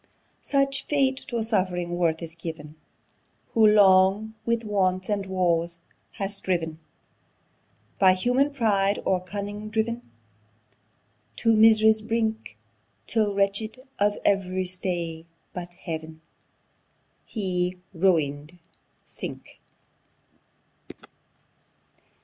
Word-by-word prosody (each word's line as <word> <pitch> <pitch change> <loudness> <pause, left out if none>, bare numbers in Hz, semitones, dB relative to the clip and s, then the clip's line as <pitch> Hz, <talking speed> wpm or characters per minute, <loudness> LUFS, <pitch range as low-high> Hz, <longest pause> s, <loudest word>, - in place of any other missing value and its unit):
Such 275 -1 +1
fate 270 -2 +2
to 235 -4 -2
suffering 185 -5 -1
worth 170 -2 0
is 165 -1 -4
giv'n, 160 -3 -8 0.8
Who 220 -1 +4
long 200 +1 +5
with 235 0 +1
wants 185 -3 0
and 200 -2 -1
woes 170 -2 0 0.4
has 200 0 -4
striv'n, 165 -4 -1 1.2
By 190 -1 +6
human 250 +9 +1
pride 205 -6 +1
or 185 -1 +1
cunning 205 +3 -6
driv'n 225 +2 -1 1.3
To 225 -1 +2
mis'ry's 220 0 +6
brink; 220 0 -2 0.5
Till 210 -3 0
wrench'd 200 +4 0 0.2
of 205 0 +2
ev'ry 185 -2 +1
stay 175 -3 -2 0.3
but 175 -1 -6
Heav'n, 160 -1 -7 1.0
He, 180 -4 -2 0.2
ruin'd, 160 -3 0 0.5
sink! - - -9
195 Hz, 90 wpm, -25 LUFS, 175-220 Hz, 1.3 s, By